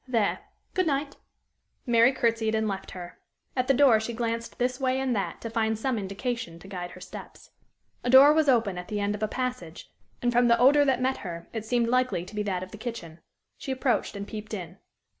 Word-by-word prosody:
There 230 -5 +1 0.3
good 370 -2 +1
night!" 285 0 -1 0.7
Mary 235 +1 +5
courtesied, 230 -3 0
and 220 0 0
left 195 -2 -4
her. 175 -1 -9 0.4
At 255 -1 0
the 270 - +5
door 255 -5 +6
she 220 +2 -4
glanced 230 0 -3
this 250 +1 -1
way 260 -1 +1
and 260 -2 0
that 200 - -3
to 230 - -5
find 220 -1 0
some 240 +1 -1
indication 200 -2 -4
to 185 - -14
guide 180 -2 -5
her 185 - -12
steps. 180 - -11 0.5
A 245 - -1
door 270 +4 +9
was 310 -2 +3
open 225 -8 +2
at 180 - -8
the 210 -1 -3
end 205 0 0
of 210 - -6
a 215 - +1
passage, 250 -9 -5 0.3
and 245 - +1
from 240 0 +4
the 235 0 +5
odor 285 +4 +5
that 260 -2 +1
met 260 +1 +1
her, 170 -3 -7
it 220 -2 -4
seemed 235 0 +1
likely 250 -7 +1
to 195 - -13
be 210 - -2
that 190 -3 -2
of 185 - -10
the 215 - -10
kitchen. 220 -9 -7 0.4
She 270 - -5
approached, 255 -4 0
and 200 0 -6
peeped 215 0 -6
in. 180 0 -8
230 Hz, 220 wpm, -27 LUFS, 200-255 Hz, 0.7 s, door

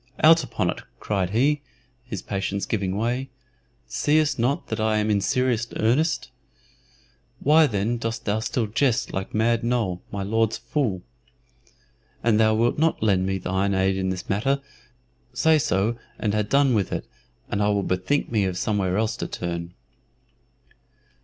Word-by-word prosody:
"Out 160 +1 +7
upon - - -1
it!" - - -8 0.2
cried 95 -4 -1
he, 140 +8 +2 0.4
his 110 -7 -6
patience 100 0 -2
giving 100 -3 -1
way. 125 +4 -1 0.6
"Seest 150 - +1
not 125 +5 0
that - - -3
I 110 0 +2
am 105 0 +1
in 100 -1 +2
serious 120 +1 +1
earnest? 140 +9 +1 1.1
Why 155 +2 +5
then 110 +1 -1
dost 115 0 -4
thou 105 +1 +1
still 115 +1 -1
jest 120 +3 0
like 95 +2 -4
Mad 115 +1 +2
Noll, 115 -7 0
my 100 -1 -3
Lord's 110 +2 +1
fool? 115 -6 -2 1.2
An 115 -2 +3
thou 110 0 +4
wilt 120 +5 +1
not 160 -7 +1
lend 95 -3 +2
me 95 0 0
thine 95 +2 0
aid 95 0 +2
in 95 -1 -1
this 95 -1 -4
matter, 135 +8 +1 0.8
say 160 -1 +4
so 115 -1 0 0.2
and 105 -2 -1
ha' 105 - +2
done 140 -2 +4
with 100 -5 0
it, - - -3 0.4
and 105 - -1
I 105 - +2
will 100 -1 +1
bethink 95 +13 -1
me 105 -4 +2
of 90 -1 -2
somewhere 100 -4 0
else 110 0 0
to - - -3
turn." 85 0 -5
110 Hz, 160 wpm, -24 LUFS, 95-125 Hz, 1.2 s, Out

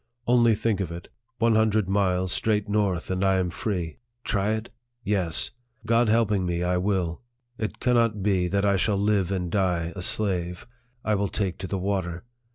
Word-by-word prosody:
Only 120 -2 +4
think 105 -1 0
of 90 -4 -2
it; 85 +1 -8 0.3
one 115 -1 +3
hundred 110 -2 +2
miles 95 -2 +1
straight 105 -2 +1
north, 100 -5 0
and 95 +1 0
I 95 0 +3
am 90 -2 0
free! 90 -5 -3 0.2
Try 105 0 +1
it? 110 +1 -6 0.3
Yes! 95 -6 0 0.3
God 115 0 +3
helping 105 -3 +2
me, 85 -1 -1
I 90 0 +1
will. 90 -2 -1 0.4
It 110 - -3
cannot 115 -4 +2
be 95 -3 +2
that 100 +2 +1
I 100 -1 +3
shall 100 +2 +1
live 100 -2 +1
and 90 -3 -2
die 90 -4 0
a 90 - -5
slave. 90 -3 -1 0.4
I 110 - +2
will 100 0 +1
take 95 -3 -2
to 95 - -4
the 100 - -2
water. 90 -2 -2
100 Hz, 180 wpm, -26 LUFS, 90-105 Hz, 0.4 s, Only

